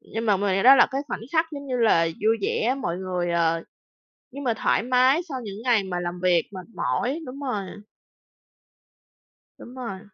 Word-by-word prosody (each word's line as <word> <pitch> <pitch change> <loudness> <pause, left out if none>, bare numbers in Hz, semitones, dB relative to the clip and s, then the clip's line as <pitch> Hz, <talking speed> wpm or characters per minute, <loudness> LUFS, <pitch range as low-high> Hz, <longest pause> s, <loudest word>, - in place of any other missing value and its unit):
Nhưng 225 +1 -5
mà 205 -2 +4
mình 195 -1 0
nghĩ 195 - +1
đó 265 +3 +9
là - - +6
cái 270 - -2
khoảnh - - -4
khắc 325 0 +2
giống 280 -1 -7
như 255 -2 -2
là 215 -8 +4
vui 215 +7 0
vẻ, 245 +6 0
mọi 170 0 -2
người, 180 -2 -2
ờ 165 -1 +1 0.7
nhưng 280 +1 -7
mà 235 -3 +1
thoải - - +1
mái 255 +5 +3
sau 260 -3 -4
những 205 +1 -8
ngày 235 -5 +2
mà 180 -2 -3
làm 175 0 -5
việc 175 -3 +3
mệt 185 -1 -8
mỏi, 275 +7 -1
đúng 265 +3 -8
rồi. 215 -8 -3 1.9
Đúng 245 - -12
rồi. 230 -7 -6
220 Hz, 195 wpm, -24 LUFS, 185-255 Hz, 1.9 s, đó